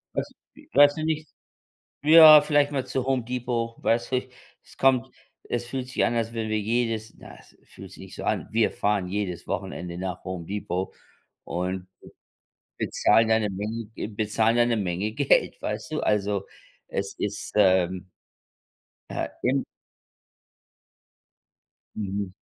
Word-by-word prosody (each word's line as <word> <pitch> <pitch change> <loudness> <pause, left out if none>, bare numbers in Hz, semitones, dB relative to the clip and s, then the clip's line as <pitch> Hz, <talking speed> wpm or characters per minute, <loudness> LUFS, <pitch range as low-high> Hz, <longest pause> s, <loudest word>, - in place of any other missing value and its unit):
Weiß - - 0 0.3
wi - - -18
weiß 145 +1 +7
du 155 - -4
nicht 155 -1 -1 0.8
ja, 155 -1 +10
vielleicht 145 -1 +2
mal 135 -2 -1
zu 130 -2 -2
Home 130 -2 0
Depot, 120 -1 -3
weißt 115 +2 0
du? 130 0 0 0.4
Es - - -18
kommt 130 -3 +3 0.4
es 120 0 -2
fühlt 130 0 -4
sich 130 - +1
an, 120 - 0
als 115 0 -1
wenn 110 -1 -3
wir 110 0 0
jedes 115 0 -1
na, - - -12
es - - -21
fühlt - - -13
sich - - -14
nicht - - -11
so - - -7
an, - - -1
wir 110 0 +2
fahren 100 -3 0
jedes 90 -3 -3
Wochenende 85 -1 -4
nach 90 0 -5
Home 90 -2 -5
Depot 95 -1 -3 0.5
und 90 +1 -3 0.9
bezahlen 115 0 +3
da 110 0 +4
'ne 105 -2 -1
Menge 105 +4 -4
Ge - - -4
bezahlen 110 +2 +1
da 120 0 +4
'ne 120 -1 +1
Menge 95 +1 -2
Geld, 140 +4 +2
weißt - - -4
du? - - -1
Also, 100 -2 0 0.4
es 100 0 -3
ist, 100 0 -4
ähm, 95 -2 +2 1.0
äh, - - -3
im 135 +2 +2 2.3
Mhm. 100 -2 -3
110 Hz, 150 wpm, -25 LUFS, 100-125 Hz, 2.3 s, ja